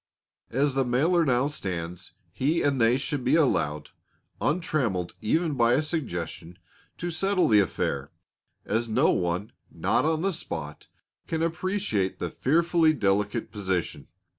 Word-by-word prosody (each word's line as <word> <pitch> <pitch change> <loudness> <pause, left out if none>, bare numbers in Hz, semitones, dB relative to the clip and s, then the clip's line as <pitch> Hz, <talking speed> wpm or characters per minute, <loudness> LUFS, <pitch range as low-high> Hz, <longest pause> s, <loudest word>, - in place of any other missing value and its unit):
As 140 +3 +1
the 135 0 +2
mailer 155 +8 +2
now 130 -3 +2
stands, 90 - -5 0.2
he 145 - 0
and 140 -3 +1
they 115 +2 +4
should 140 -1 -3
be 125 - +3
allowed, 80 - +1 0.5
untrammeled 130 - 0
even 160 +7 +1
by 120 -2 +3
a 155 - +2
suggestion, 90 - -4 0.4
to 175 0 -3
settle 195 +3 +1
the 105 -2 +5
affair, 70 -7 -1 0.6
as 115 +2 -1
no 110 - +3
one 90 +3 -1 0.2
not - - 0
on 160 +1 0
the 195 0 +1
spot 75 - -6 0.4
can 160 0 -1
appreciate 170 - -1
the - - -4
fearfully 165 +2 +3
delicate 105 -2 0
position. 95 -5 -3
125 Hz, 140 wpm, -26 LUFS, 95-160 Hz, 0.6 s, the